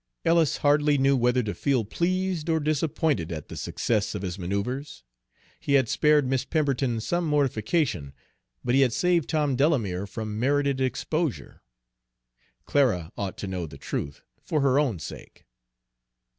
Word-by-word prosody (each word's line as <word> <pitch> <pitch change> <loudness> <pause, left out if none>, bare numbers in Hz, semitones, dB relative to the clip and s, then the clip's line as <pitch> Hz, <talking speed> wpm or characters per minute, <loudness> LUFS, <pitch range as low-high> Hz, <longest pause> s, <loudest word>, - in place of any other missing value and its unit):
Ellis 165 -2 +3
hardly 145 0 +3
knew 135 +1 +3
whether 125 0 +2
to 105 -2 -3
feel 125 - 0
pleased 180 - -1
or 160 -1 +2
disappointed 150 - 0
at 80 -3 -6
the - - -7
success - - -1
of - - -4
his 90 0 -4
manoeuvres. 100 - -3 0.6
He 140 - -1
had 135 -4 +4
spared 150 -2 +3
Miss 130 0 0
Pemberton 135 -6 0
some 175 +10 -1
mortification, 130 - 0 0.5
but 120 - 0
he 135 - +5
had 125 -4 +3
saved 175 -1 +1
Tom 150 -4 +1
Delamere 115 - +1
from 110 +1 -5
merited 140 +1 +1
exposure. 140 +3 -2 1.0
Clara 105 - +1
ought 100 -2 -4
to 100 - -5
know 90 -3 -3
the - - -11
truth, 70 - -5 0.2
for 155 - -1
her 135 0 +3
own 130 -10 +1
sake. 75 - -10
135 Hz, 150 wpm, -26 LUFS, 105-150 Hz, 1.0 s, he